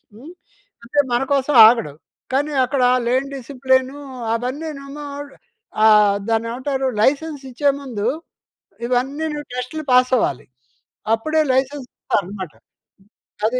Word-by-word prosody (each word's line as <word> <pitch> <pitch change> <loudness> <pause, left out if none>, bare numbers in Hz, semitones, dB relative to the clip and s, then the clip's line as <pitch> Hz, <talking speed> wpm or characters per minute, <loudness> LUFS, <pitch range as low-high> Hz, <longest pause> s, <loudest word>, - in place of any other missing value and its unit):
హ్మ్, 275 +10 -12 0.5
అంటే 270 +5 -1
మనకోసం 270 +3 +1
ఆగడు. 225 -11 +1 0.4
కానీ 290 +3 +1
అక్కడ 260 0 0 0.2
లేన్ 260 +3 +1
డిసిప్లిన్ 260 0 0 0.4
అవన్నీనేమో 275 +3 -5 0.8
ఆహ్, 210 -2 +5
దాన్నేమంటారు, 255 +4 -1
లైసెన్స్ 290 +4 +1
ఇచ్చేముందు 270 -5 -1 0.8
ఇవన్నీను 285 +5 -1
టెస్ట్‌లు 250 +5 -4
పాస్ 250 0 +4
అవ్వాలి. 140 - -1 0.7
అప్పుడే 310 +8 0
లైసెన్స్ 265 0 -1
ఇస్తారన్నమాట. 190 -4 -3 0.9
అది. 250 +3 +1
260 Hz, 95 wpm, -20 LUFS, 235-285 Hz, 0.9 s, ఆహ్